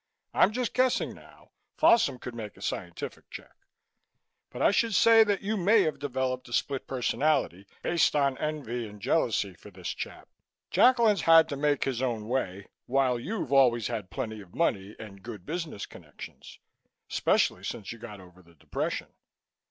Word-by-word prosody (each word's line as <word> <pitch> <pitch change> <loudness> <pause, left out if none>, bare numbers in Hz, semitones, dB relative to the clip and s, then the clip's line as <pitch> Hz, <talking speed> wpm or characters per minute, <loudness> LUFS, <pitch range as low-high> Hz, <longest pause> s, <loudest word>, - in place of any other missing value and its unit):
I'm - - +4
just 245 0 -2
guessing 255 -1 +1
now - - -18 0.3
Folsom 230 - +4
could 125 0 -8
make 110 -3 -8
a - - -15
scientific 85 -1 -5
check - - -10 1.0
but - - -9
I - - +4
should 220 +1 +1
say 225 -1 +7
that 205 -2 -1
you 215 +2 -1
may 205 +3 +4
have 155 -3 -2
developed 130 -2 -2
a - - -8
split 135 +3 -1
personality, 125 - 0 0.2
based 170 -3 +2
on 140 -2 +2
envy 130 -7 -3
and 105 0 -12
jealousy 105 - 0
for 90 - -14
this 90 -3 -7
chap. - - -6 0.4
Jacklin's 230 -7 +4
had 165 -1 +7
to 140 - -3
make 145 0 +1
his 130 -2 -2
own 115 -5 -2
way, 100 -6 -2 0.2
while 130 -1 +2
you've 160 - -4
always 120 -5 +4
had 105 -4 -4
plenty 110 -5 -5
of 90 -3 -16
money 105 -11 0
and 100 -3 -11
good 105 -4 -9
business 160 - -4
connections, 75 -5 -12 0.5
especially - - +1
since 100 - -5
you 115 - -9
got 105 -3 -9
over 90 0 -16
the 85 -1 -22
depression. - - -4
130 Hz, 165 wpm, -28 LUFS, 105-165 Hz, 1.0 s, say